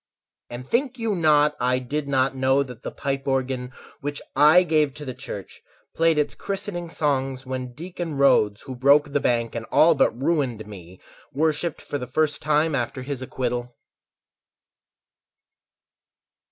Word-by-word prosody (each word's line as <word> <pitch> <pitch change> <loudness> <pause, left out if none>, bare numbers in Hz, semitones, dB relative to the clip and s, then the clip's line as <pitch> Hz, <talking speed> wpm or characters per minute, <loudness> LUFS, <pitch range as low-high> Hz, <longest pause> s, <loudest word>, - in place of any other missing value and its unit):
And 125 +1 -8
think 260 - 0
you 225 -2 -1
not 150 -3 +4
I 125 +1 +2
did 140 +3 -3
not 135 -1 +1
know 130 +1 +2
That 125 -4 -11
the - - -5
pipe 135 0 -4
organ, 130 -1 -1 0.3
which 145 -1 -4 0.2
I 155 +6 +7
gave 155 -5 +1
to 150 0 -8
the 130 - -5
church, 100 -5 -9 0.3
Played 165 -1 +3
its 150 - +1
christening 190 -3 -5
songs 135 -4 -1
when 130 -1 -5
Deacon 170 -2 -5
Rhodes, 105 -7 +3
Who 130 -2 -7
broke 140 +4 +4
and 115 -4 0
all 165 +1 +5
but 125 -5 +1
ruined 135 -7 0
me, 95 -3 -12 0.3
Worshipped 155 +3 -1
for 145 - -4
the 125 - -6
first 150 +2 0
time 155 +1 +2
after 125 -1 -2
his 135 -1 -5
acquittal? 125 -1 -3
140 Hz, 145 wpm, -24 LUFS, 125-155 Hz, 0.3 s, I